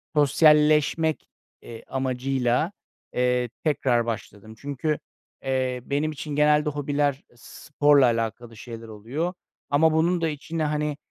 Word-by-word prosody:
sosyalleşmek, 150 +2 +3 0.3
eee, 115 -1 -10
amacıyla, 130 +3 0 0.4
eee, 125 -1 +1
tekrar 130 -6 +1
başladım. 110 -1 -6
Çünkü, 145 +3 -2 0.4
eee, 130 -2 -1
benim 145 +2 -1
için 150 0 -6
genelde 150 0 +3
hobiler 145 -1 -1
sporla 145 +2 +2
alakalı 115 0 -2
şeyler 115 0 -9
oluyor. 125 - -4 0.4
Ama 155 +2 +4
bunun 170 +2 +2
da 165 - +1
içine, 155 +2 -4
hani, 150 -1 -1
140 Hz, 115 wpm, -25 LUFS, 125-150 Hz, 0.4 s, Ama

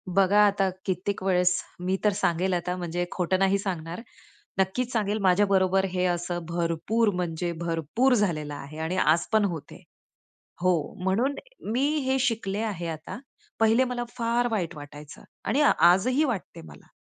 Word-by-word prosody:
बघा 195 +2 +3
आता, 195 -1 +2 0.2
कित्येक 190 +1 -2
वेळेस 180 -1 +2 0.2
मी 185 +2 -1
तर 210 - +4
सांगेल 180 0 0
आता, 180 +1 -1
म्हणजे 175 0 -2
खोटं 185 +1 0
नाही 195 0 +3
सांगणार, 175 -1 -4 0.6
नक्कीच 230 +7 0
सांगेल, 210 -2 0
माझ्याबरोबर 190 0 +3
हे 180 0 -1
असं 175 0 -1
भरपूर 170 +7 0
म्हणजे 175 -1 -2
भरपूर 170 - +1
झालेलं 165 -10 0
आहे 145 +2 -9
आणि 160 +4 -2
आज 165 -2 +3
पण 215 -2 +4
होत 170 -6 -5
आहे - - -13 0.8
हो. 175 -5 +1
म्हणून 230 +9 +1 0.4
मी 255 +4 +1 0.2
हे 265 0 +1
शिकले 225 -6 -1
आहे 195 -6 -3
आता. 160 +5 -6 0.4
पहिले 225 +3 +4
मला 245 -1 -3
फार 235 0 0
वाईट 180 -6 -2
वाटायचं 145 0 -11 0.2
आणि 270 - +1
आजही 250 - +4
वाटतं 235 - -3
आहे 80 - -11
मला, 75 -1 -15
185 Hz, 155 wpm, -26 LUFS, 170-215 Hz, 0.8 s, तर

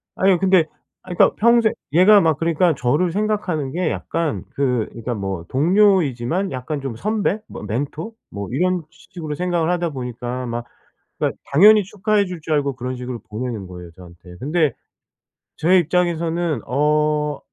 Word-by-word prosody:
아니요. 190 -2 +3
근데 185 -3 +4 0.4
아 - - -14
그니까 - - +4
평생 235 0 +4 0.2
얘가 200 +5 +7
막 160 -3 +2
그러니까 165 +1 +2
저를 145 +8 +1
생각하는 195 -8 -1
게 175 +2 -1
약간 165 -3 -2
그 125 -5 0
그러니까 115 +1 -5
뭐 95 -5 -4
동료이지만 175 - +2
약간 135 +3 -4
좀 135 -4 -5
선배, 210 - -1
뭐 - - -9
멘토 140 - -4 0.2
뭐 100 -1 -6
이런 180 +6 0
식으로 155 -4 -8
생각을 175 0 0
하다 175 -2 0
보니까 125 -1 -5
막 120 0 -4 0.5
그니까 - - -1 0.2
당연히 210 +7 +7
축하해 210 +1 0
줄 180 -2 -7
줄 155 0 -2
알고 140 -2 0
그런 125 +1 -4
식으로 125 -1 -6
보내는 110 -2 -4
거예요, 90 -1 -10
저한테. 90 0 -14
근데 155 - +1 0.8
제 180 +4 +4
입장에서는 170 - 0
어 150 +1 +1
155 Hz, 330 characters per minute, -21 LUFS, 125-180 Hz, 0.8 s, 얘가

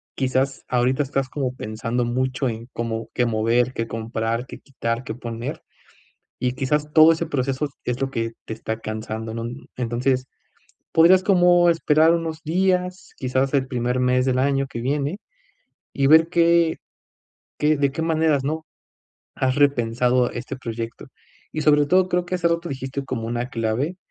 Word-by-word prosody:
quizás 135 +1 0
ahorita 125 +3 +2
estás 135 -1 -2
como 130 -3 -3
pensando 115 +1 -3
mucho 130 +2 -1
en, 115 +1 -6
¿cómo 115 -1 -4
qué 125 - +1
mover, 115 +2 +1
qué 115 0 -3
comprar, 115 +1 -3
qué - - -10
quitar, 115 -3 -3
qué 110 - -5
poner?, 120 +5 -6 0.8
y 125 - 0
quizás 150 +3 -1
todo 160 +1 +8
ese 165 +1 -3
proceso 135 0 -1 0.2
es 125 +1 -2
lo 135 0 -1
que 115 -1 -2
te - - -5
está 110 0 -5
cansando, 110 0 -5
¿no? 115 0 -4 0.3
Entonces, 125 +2 0 0.7
podrías 180 +3 +6
como 175 -2 +5
esperar 160 -1 +4
unos 165 -1 -3
días, 180 +2 0
quizás 130 +1 0
el 135 -2 +2
primer 125 0 -1
mes 125 0 +2
del 130 -1 +1
año 135 0 +1
que 120 -4 -6
viene, 145 +6 -1 0.8
y 140 - +2
ver 160 +2 +7
qué 170 -1 +3 0.8
qué 150 +1 +3
de 140 -1 +1
qué 160 - -4
maneras, 160 -3 +2
¿no?, 155 +2 -2 0.7
has 130 0 0
repensado 125 -3 +2
este 125 +3 -6
proyecto 115 -2 -6 0.5
y, 155 - -2
sobre 150 -1 +4
todo, 185 +3 +3
creo 180 -1 0
que 185 +1 -1
hace 175 - 0
rato 170 +1 -1
dijiste 135 +1 -4
como 115 -4 -4
una 120 +2 -2
clave 115 +9 -1
130 Hz, 160 wpm, -23 LUFS, 120-155 Hz, 0.8 s, todo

